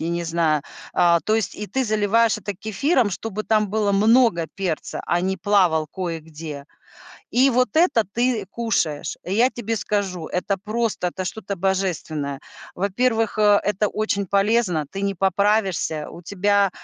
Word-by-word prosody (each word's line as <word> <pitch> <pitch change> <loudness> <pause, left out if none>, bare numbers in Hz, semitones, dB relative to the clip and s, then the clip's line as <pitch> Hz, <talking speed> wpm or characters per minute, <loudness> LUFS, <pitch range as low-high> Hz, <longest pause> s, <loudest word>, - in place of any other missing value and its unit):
я 160 - -2
не 170 0 -1
знаю. 165 -3 +1 0.3
Э, 170 -1 +4
то 215 - +2
есть 220 -4 -1
и 210 - -5
ты 265 +7 -1
заливаешь 215 +1 +2
это 205 - -4
кефиром, 220 - +1
чтобы 215 +2 -4
там 215 -1 +1
было 210 0 0
много 210 -4 +4
перца, 180 -5 -3
а 175 - +1
не 190 +1 -1
плавал 175 -5 +2
кое-где. 160 -4 -6 0.7
И 260 +3 +4
вот 250 0 +2
это 315 -9 +4
ты 240 -3 0
кушаешь. 200 -11 -1
Э, 180 - -6
я 240 +5 +4
тебе 230 -2 -3
скажу, 195 -5 -2
это 190 +2 -1
просто, 220 -3 -1
это 185 +1 -4
что-то 200 +2 -4
божественное. 170 -7 -2 0.4
Во-первых, 225 +3 0
э, 205 -1 +5
это 205 +1 +1
очень 200 -2 -1
полезно. 200 -5 +2
Ты 195 - -5
не 200 0 -1
поправишься, 190 -4 +1
у 170 - -11
тебя, 200 +2 +2
200 Hz, 155 wpm, -22 LUFS, 175-220 Hz, 0.7 s, э